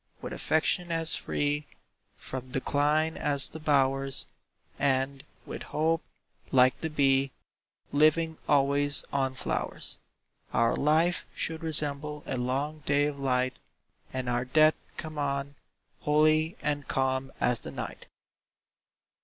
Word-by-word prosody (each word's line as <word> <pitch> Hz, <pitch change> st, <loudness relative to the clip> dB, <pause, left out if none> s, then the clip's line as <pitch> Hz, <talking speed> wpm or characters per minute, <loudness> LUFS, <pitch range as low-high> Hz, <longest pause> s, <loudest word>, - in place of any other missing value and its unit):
With -, -, -7 dB
affection 170 Hz, +2 st, 0 dB
as 165 Hz, -1 st, +1 dB
free 145 Hz, 0 st, -2 dB, 0.5 s
From 130 Hz, -1 st, -7 dB
decline 150 Hz, +4 st, 0 dB
as 140 Hz, -3 st, +8 dB
the 160 Hz, -, -9 dB
bowers, 135 Hz, -2 st, +1 dB, 0.5 s
And, 135 Hz, 0 st, 0 dB, 0.2 s
with -, -, -7 dB
hope, 165 Hz, +2 st, 0 dB, 0.5 s
like 130 Hz, -1 st, +4 dB
the 160 Hz, -, -2 dB
bee, 135 Hz, -2 st, +2 dB, 0.6 s
Living 155 Hz, +2 st, +2 dB
always 145 Hz, 0 st, +2 dB
on 135 Hz, -1 st, 0 dB
flowers, -, -, -4 dB, 0.6 s
Our 115 Hz, 0 st, +3 dB
life 160 Hz, +4 st, +2 dB
should 160 Hz, -1 st, -2 dB
resemble 150 Hz, -2 st, +1 dB
a -, -, -3 dB
long 135 Hz, +5 st, -2 dB
day 145 Hz, 0 st, +2 dB
of 145 Hz, -1 st, -4 dB
light, 130 Hz, -1 st, 0 dB, 0.5 s
And 130 Hz, -1 st, -4 dB
our 120 Hz, 0 st, 0 dB
death 155 Hz, +4 st, +4 dB, 0.2 s
come 155 Hz, -2 st, -6 dB
on, 140 Hz, 0 st, -2 dB, 0.5 s
holy 155 Hz, +2 st, +2 dB
and 145 Hz, -2 st, -2 dB
calm 130 Hz, 0 st, -1 dB
as 125 Hz, -1 st, +3 dB
the -, -, -5 dB
night. -, -, -7 dB
145 Hz, 120 wpm, -28 LUFS, 135-155 Hz, 0.6 s, as